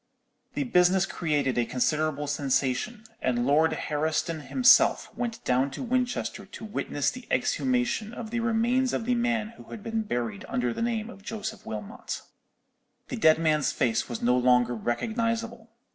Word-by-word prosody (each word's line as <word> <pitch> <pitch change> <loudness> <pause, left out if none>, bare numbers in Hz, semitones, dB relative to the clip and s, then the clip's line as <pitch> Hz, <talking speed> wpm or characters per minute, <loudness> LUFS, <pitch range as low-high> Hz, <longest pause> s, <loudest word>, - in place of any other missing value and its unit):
The - - 0
business 185 -5 +4
created 145 -9 0
a 120 - +2
considerable 150 +3 0
sensation, 140 - -1 0.2
and 120 -1 +1
Lord 155 +4 +4
Herriston 155 +1 -2
himself 255 -1 +5
went 235 -2 -4
down 130 +2 +2
to - - -4
Winchester 245 -5 -1
to 220 - -9
witness 145 -9 -1
the 255 -1 -10
exhumation 245 -4 0
of 235 -2 -7
the 235 - -1
remains 235 +3 +1
of 225 - -1
the 250 - +2
man 235 -3 0
who 230 - -14
had 210 - -9
been 225 0 -1
buried 120 - -3
under 125 -1 0
the - - -5
name 230 -1 -1
of 200 - -13
Joseph 220 +1 -6
Wilmot. 105 -2 -6 0.9
"The - - -3
dead 155 0 +5
man's 155 -2 +2
face 120 -6 0
was 120 - -5
no 125 +1 +4
longer 125 -1 +3
recognizable. 230 - -2
185 Hz, 160 wpm, -27 LUFS, -, 0.9 s, himself